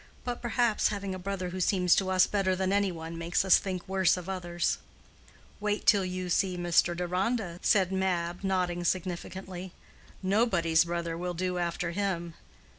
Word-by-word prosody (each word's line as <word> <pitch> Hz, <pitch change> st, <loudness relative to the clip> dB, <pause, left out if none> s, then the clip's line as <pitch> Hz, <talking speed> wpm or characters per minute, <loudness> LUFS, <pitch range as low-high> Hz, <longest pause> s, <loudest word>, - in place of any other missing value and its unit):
But, 245 Hz, -1 st, -4 dB
perhaps, 240 Hz, -2 st, +2 dB
having 200 Hz, -2 st, -3 dB
a 185 Hz, -, -5 dB
brother 185 Hz, -1 st, -3 dB
who 185 Hz, +1 st, -5 dB
seems 180 Hz, -1 st, +3 dB
to 190 Hz, -1 st, +1 dB
us 185 Hz, -1 st, +5 dB
better 195 Hz, -2 st, 0 dB
than 190 Hz, +1 st, 0 dB
any 200 Hz, -1 st, +2 dB
one 165 Hz, 0 st, -7 dB
makes 170 Hz, +3 st, 0 dB
us 190 Hz, -, +6 dB
think 185 Hz, -3 st, -5 dB
worse 190 Hz, -1 st, +3 dB
of 180 Hz, 0 st, -7 dB
others." 175 Hz, -2 st, -1 dB, 0.8 s
"Wait 210 Hz, 0 st, -1 dB
till 200 Hz, -3 st, +5 dB
you 185 Hz, 0 st, -4 dB
see 180 Hz, +1 st, +1 dB
Mr. 175 Hz, 0 st, +2 dB
Deronda," 180 Hz, +1 st, -1 dB
said 190 Hz, -3 st, +3 dB
Mab, 180 Hz, -2 st, -1 dB
nodding 180 Hz, -2 st, 0 dB
significantly. 185 Hz, +1 st, -3 dB, 0.5 s
"Nobody's 185 Hz, -5 st, +3 dB
brother 170 Hz, -1 st, -3 dB
will 175 Hz, +1 st, -4 dB
do 180 Hz, +1 st, -1 dB
after 170 Hz, 0 st, -2 dB
him." 175 Hz, -3 st, -2 dB
185 Hz, 165 wpm, -29 LUFS, 175-195 Hz, 0.8 s, us